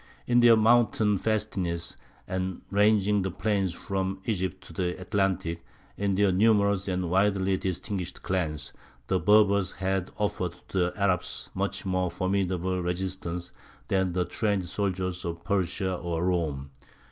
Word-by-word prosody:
In 120 0 +4
their 120 -1 +7
mountain 110 -2 +4
fastnesses, 95 -6 -1 0.3
and 95 0 -3
ranging 105 0 +3
the 95 - -1
plains 100 -1 0
from 95 +1 -3
Egypt 95 -3 -2
to - - -12
the 90 -1 -2
Atlantic, 95 -4 -1 0.3
in 100 -1 0
their 100 0 +3
numerous 100 0 +3
and 90 -2 -1
widely 95 0 +2
distinguished 95 0 -4
clans, 80 -6 -2 0.3
the 95 - +1
Berbers 100 -2 +4
had 95 -1 -1
offered 95 -4 -1 0.2
to - - -3
the 90 0 +1
Arabs 100 -3 -1
a - - -11
much - - -2
more 95 -1 0
formidable 95 -1 -1
resistance 90 -1 -3 0.4
than 95 -2 +1
the 90 0 +1
trained 100 -4 -1
soldiers 90 -1 -2
of 85 -1 -5
Persia 95 -1 0
or 85 -1 -2
Rome. 75 -7 -1
95 Hz, 140 wpm, -27 LUFS, 90-100 Hz, 0.4 s, their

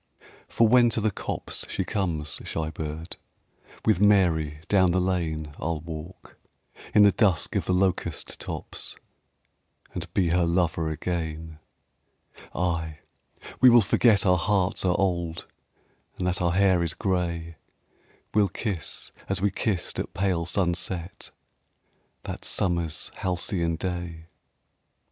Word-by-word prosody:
For 115 - +3
when 120 +1 +6
to 115 - 0
the 110 0 +1
copse - - -4
she 95 - -1
comes, 85 -9 -2
shy 80 -1 -3
bird, 80 +2 -6 0.7
With 110 -5 +3
Mary 85 -7 +3
down 95 -3 +4
the 90 +2 +2
lane 80 -5 -1
I'll 80 +1 -1
walk, 80 +3 -9 0.6
in 105 - +8
the 100 - +7
dusk 95 -4 +1
of - - 0
the 90 - +1
locust 90 -3 0
tops, - - -6 1.0
And 85 -1 -6
be 90 -4 +3
her 90 +1 +3
lover 85 -1 +1
again. 80 -1 -4 1.0
Ay, 80 -3 -1 0.6
we 130 - +8
will 120 -1 +8
forget 110 +1 +4
our 90 -2 +4
hearts 100 0 +1
are 90 -1 +2
old, 85 -3 -1 0.7
And 90 - -2
that 90 0 0
our 85 -1 +2
hair 95 -2 +4
is 85 -1 -2
gray. 85 -4 -2 0.8
We'll 105 -2 +4
kiss 95 -3 -4 0.2
as 95 -1 0
we 100 +1 +1
kissed 95 -1 -1
at - - -5
pale 90 -4 0
sunset 90 -1 -2 0.9
That - - -6
summer's 85 -4 -1
halcyon 90 -2 -1
day. 85 -2 -5
90 Hz, 130 wpm, -26 LUFS, 80-95 Hz, 1.0 s, in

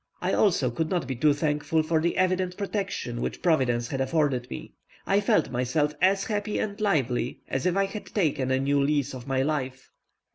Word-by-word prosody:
I - - -1
also 155 - +3
could 160 +6 -2
not 175 -6 0
be 130 0 -3
too 150 +5 +3
thankful 150 +1 0
for 160 0 +1
the 170 +1 0
evident 185 -1 +1
protection 195 - -3
which - - -4
Providence 125 -8 +2
had 135 -1 -2
afforded 135 -3 0
me. - - -8 0.3
I 200 +1 +3
felt 165 -9 +2
myself 130 +4 0
as 195 +1 +3
happy 210 -1 -2
and 210 0 -3
lively 130 - 0
as 135 +5 -1
if 180 +1 +1
I 195 - +3
had 205 +2 -7
taken 150 -9 0
a 130 0 +2
new 140 +1 +2
lease 140 -1 +1
of 125 -1 -8
my 135 -1 +1
life. 130 -3 -3
150 Hz, 195 wpm, -26 LUFS, 130-185 Hz, 0.3 s, also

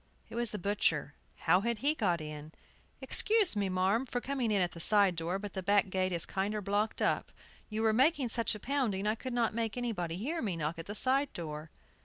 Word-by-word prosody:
It - - -9
was 240 -1 +2
the 210 - -3
butcher. 175 -7 0 0.3
How 180 - +4
had 235 +1 -1
he 285 +7 +2
got 180 - 0
in? 150 0 -8 0.5
"Excuse 430 - +4
me, 200 -2 0
marm, 190 +7 +1
for 245 - -2
coming 260 -2 -2
in 205 -2 +2
at 175 -2 +1
the 170 - -10
side 200 0 +4
door, 165 +3 -2
but 205 0 -7
the 190 - -3
back 200 0 +2
gate 185 0 0
is 170 -2 0
kinder 200 +2 -2
blocked 205 +2 -1
up. - - 0 0.4
You 220 +1 -2
were 220 -1 +3
making 270 +1 +3
such 230 -1 +2
a - - -8
pounding 235 -7 -1
I 215 - +2
could 255 +3 -6
not 235 -2 +1
make 230 0 -2
anybody 200 -9 -2
hear 310 - -3
me 195 -7 -2
knock 160 +1 -3
at 165 - -8
the 205 - -5
side 270 +4 +3
door." 155 -2 -6
205 Hz, 225 wpm, -31 LUFS, 180-235 Hz, 0.5 s, How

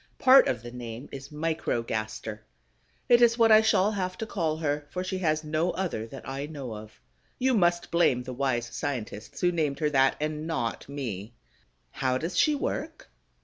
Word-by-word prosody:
Part 265 +1 +7
of 120 -3 -1
the 120 - -8
name 120 +1 -7
is 135 0 -8
Microgaster. 115 -8 -3 0.7
It 240 0 +6
is 235 -1 +5
what 225 -1 +5
I 215 0 +9
shall 210 -2 +3
have 185 -3 -3
to 225 - -3
call 165 -7 -1
her, 145 -2 -2
for 180 +4 -3
she 185 0 -3
has 155 -3 +1
no 155 +3 0
other 165 -13 -3
that 135 +3 -10
I 135 +2 -4
know 140 -6 -6
of. 110 0 -11 0.4
You 260 +1 +2
must 175 -5 +2
blame 135 -7 +3
the 130 0 -6
wise 125 -2 0
scientists 115 -4 -5
who 180 -1 +3
named 155 -5 0
her 150 0 0
that, 135 -1 +4
and 155 +1 -3
not 125 -7 -3
me. 120 -6 -5 0.6
How 130 -1 0
does 165 +6 -4
she 300 - +4
work? 275 - -4
150 Hz, 185 wpm, -27 LUFS, 125-175 Hz, 0.7 s, I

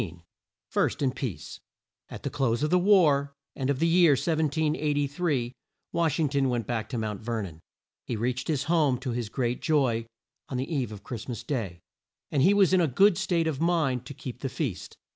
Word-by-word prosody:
FIRST - - 0
IN 130 - +2
PEACE. 125 -5 -6 0.5
At - - -9
the 140 - -3
close 130 -3 0
of 150 - 0
the 180 - +5
war, 150 -8 +4 0.2
and 135 -1 -2
of 140 - +1
the 165 - +1
year 170 -2 +5
1783, 150 -2 0 0.4
Wash 165 -2 +1
ing 155 - +3
ton 140 -1 +1
went 120 -3 -1
back 110 -2 -3
to 120 - -3
Mount 105 -3 -3
Ver 115 -1 -2
non. 85 -5 -9 0.5
He 120 - -2
reached 125 +3 -2
his 150 -3 0
home 150 -4 +2
to 125 0 -4
his 120 -2 -3
great 120 0 -2
joy 130 -8 +1 0.4
on 130 - -3
the 135 +6 -3
eve 130 -7 -1
of 105 -1 -9
Christ 115 +1 -7
mas 120 - -5
day, 100 - -3 0.5
and 140 - +2
he 195 +7 +5
was 195 -3 +4
in 185 - +5
a 165 - +3
good 185 +9 +4
state 175 -3 0
of 155 -3 -2
mind 150 -8 +1
to 140 - -8
keep 125 -2 -7
the 135 - -3
feast. 125 - -4
140 Hz, 200 wpm, -27 LUFS, 120-160 Hz, 0.5 s, the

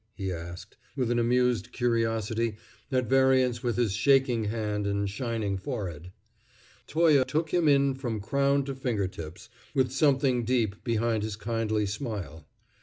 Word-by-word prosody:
he 95 -3 -3
asked, 85 +4 -8 0.2
with 125 -4 0
an 120 - +2
amused 125 0 +1
curiosity 115 -2 0 0.3
at 130 -1 +1
variance 130 -1 +3
with 120 -3 -1
his 115 -5 +1
shaking 125 -1 +3
hand 105 -1 -2
and 100 0 0
shining 105 -3 -2
forehead. 90 - -5 0.8
Toye 155 -4 +4
took 155 +5 -2
him 175 -3 +3
in 140 -1 +4
from 120 -5 -4
crown 140 +5 +1
to 135 0 -4
fingertips, 100 -8 -4 0.3
with 130 -2 +2
something 135 -3 +2
deep 115 -4 0
behind 115 -1 0
his 105 -1 -3
kindly 110 -1 -1
smile. 100 - -5
115 Hz, 140 wpm, -28 LUFS, 105-130 Hz, 0.8 s, Toye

